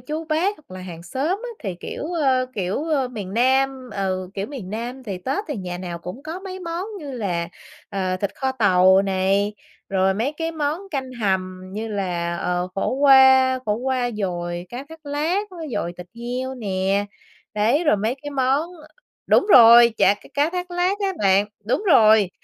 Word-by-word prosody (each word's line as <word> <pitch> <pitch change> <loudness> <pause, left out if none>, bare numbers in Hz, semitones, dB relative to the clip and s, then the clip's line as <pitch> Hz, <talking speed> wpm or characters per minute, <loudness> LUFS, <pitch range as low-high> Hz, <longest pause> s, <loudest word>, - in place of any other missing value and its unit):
chú, 315 +1 -5
bác 330 +6 0
hoặc 305 - -24
là 185 - -7
hàng 175 -2 -9
xóm 265 - -3 0.2
á, - - -4
thì, 195 -5 -4
kiểu, - - -6
ơ, 270 -7 +1
kiểu, 195 - -2
ơ, 290 -6 0
miền 205 -6 -7
Nam, 260 +1 +1
ừ, 185 -2 -2
kiểu, 195 +1 -3
miền 245 -10 -8
Nam, 240 +5 -5
thì 200 -6 -5
Tết 270 - -2
thì 295 - -3
nhà 180 -3 -5
nào 175 -2 -5
cũng 180 +10 -8
có 320 +5 -6
mấy 375 -1 -7
món 340 +1 -4
như 290 -5 -7
là, 180 -8 -2 0.4
ờ, 190 -2 -2
thịt 200 +1 -2
kho 265 -1 -1
tàu 190 -5 +5
này, 195 +2 +1 0.3
rồi 190 -1 +2
mấy 235 +8 -1
cái 325 +1 -3
món 305 +1 -2
canh 265 -3 -4
hầm 190 -5 -1
như 220 +3 -4
là, 175 -4 -2
ờ, 180 +1 -1
khổ 195 - -1
qua, 265 -1 +6
khổ 210 - +2
qua 250 +1 -1
dồi 175 -3 -3
cá 245 +6 -7
thát 320 -2 -14
lát, 310 +8 0
với 335 -4 -7
dồi 175 -5 -2
thịt 180 - -9
heo 250 +2 -4
nè. 195 -3 -1 0.5
Đấy, 230 +10 +2
rồi 295 - +4
mấy 220 +5 -1
cái 290 - -5
món 275 +4 +1 0.6
đúng - - +4
rồi, 235 -1 +9
chả 200 - +4
cá - - -18
cá 290 +3 +2
thát 360 0 -4
lát 355 +3 0
á 395 -2 0
bạn. 195 0 +3 0.2
Đúng 240 - 0
rồi, 220 - +6
235 Hz, 195 wpm, -22 LUFS, 190-285 Hz, 0.6 s, rồi